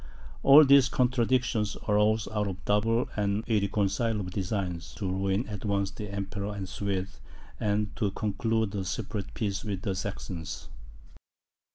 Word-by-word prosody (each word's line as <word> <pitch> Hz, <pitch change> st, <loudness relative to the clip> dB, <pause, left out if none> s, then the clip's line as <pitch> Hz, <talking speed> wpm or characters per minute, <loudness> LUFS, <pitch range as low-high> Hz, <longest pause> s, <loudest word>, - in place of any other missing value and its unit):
All 145 Hz, +2 st, +9 dB
these 140 Hz, -2 st, +6 dB
contradictions 125 Hz, -3 st, +1 dB
arose 105 Hz, +1 st, +3 dB
out 105 Hz, -1 st, -1 dB
of 95 Hz, -, -3 dB
the -, -, -17 dB
double 115 Hz, +3 st, +2 dB
and 105 Hz, 0 st, 0 dB
irreconcileable 105 Hz, -1 st, 0 dB
designs 90 Hz, -3 st, -3 dB
to 100 Hz, -, -3 dB
ruin 95 Hz, +4 st, 0 dB
at 105 Hz, -2 st, -6 dB
once 100 Hz, -2 st, 0 dB
the 105 Hz, +1 st, -7 dB
Emperor 100 Hz, +1 st, -4 dB
and 100 Hz, -, -4 dB
the 95 Hz, -, -7 dB
Swedes, 100 Hz, -2 st, -3 dB, 0.4 s
and 105 Hz, 0 st, 0 dB
to 105 Hz, -, +1 dB
conclude 110 Hz, +1 st, -1 dB
a 100 Hz, -2 st, -2 dB
separate 95 Hz, +2 st, -4 dB
peace 100 Hz, -3 st, -2 dB
with 100 Hz, -3 st, -4 dB
the 95 Hz, -, 0 dB
Saxons. 95 Hz, -3 st, -5 dB
105 Hz, 150 wpm, -28 LUFS, 95-110 Hz, 0.4 s, All